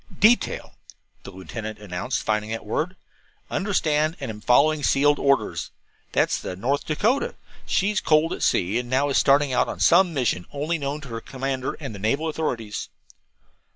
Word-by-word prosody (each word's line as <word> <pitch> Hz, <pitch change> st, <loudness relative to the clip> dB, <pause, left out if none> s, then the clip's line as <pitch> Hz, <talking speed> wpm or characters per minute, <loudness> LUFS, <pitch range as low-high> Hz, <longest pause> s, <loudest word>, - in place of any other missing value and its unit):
"DETAIL," 230 Hz, +3 st, +3 dB, 0.5 s
the -, -, -10 dB
lieutenant 95 Hz, +4 st, -7 dB
announced, 105 Hz, +4 st, -3 dB
finding 105 Hz, 0 st, -1 dB
that 115 Hz, 0 st, -4 dB
word. 160 Hz, -, -2 dB, 0.6 s
"'Understand 160 Hz, -5 st, +1 dB
and -, -, -4 dB
am 105 Hz, -1 st, -10 dB
following 145 Hz, +7 st, +4 dB
sealed 145 Hz, +1 st, +3 dB
orders'. 140 Hz, -1 st, +1 dB, 0.4 s
That's -, -, +1 dB
the 90 Hz, -, -5 dB
North 130 Hz, +9 st, -1 dB
Dakota. 215 Hz, -, +1 dB, 0.3 s
She 195 Hz, -, +2 dB
has 210 Hz, -, 0 dB
coaled 155 Hz, +2 st, +3 dB
at -, -, -6 dB
sea 95 Hz, +6 st, +2 dB
and 125 Hz, -, -5 dB
is -, -, -12 dB
now 140 Hz, +3 st, +1 dB
starting 140 Hz, 0 st, +3 dB
upon -, -, 0 dB
some 175 Hz, +1 st, +5 dB
mission 125 Hz, -, -1 dB
known 140 Hz, -, -6 dB, 0.2 s
only 140 Hz, +2 st, -3 dB
to 140 Hz, -, -10 dB
her 115 Hz, -1 st, -5 dB
commander 135 Hz, 0 st, -3 dB
and 135 Hz, -7 st, -6 dB
the 100 Hz, -, -8 dB
naval 140 Hz, +10 st, 0 dB
authorities." 120 Hz, -9 st, -3 dB
140 Hz, 165 wpm, -24 LUFS, 110-155 Hz, 0.6 s, some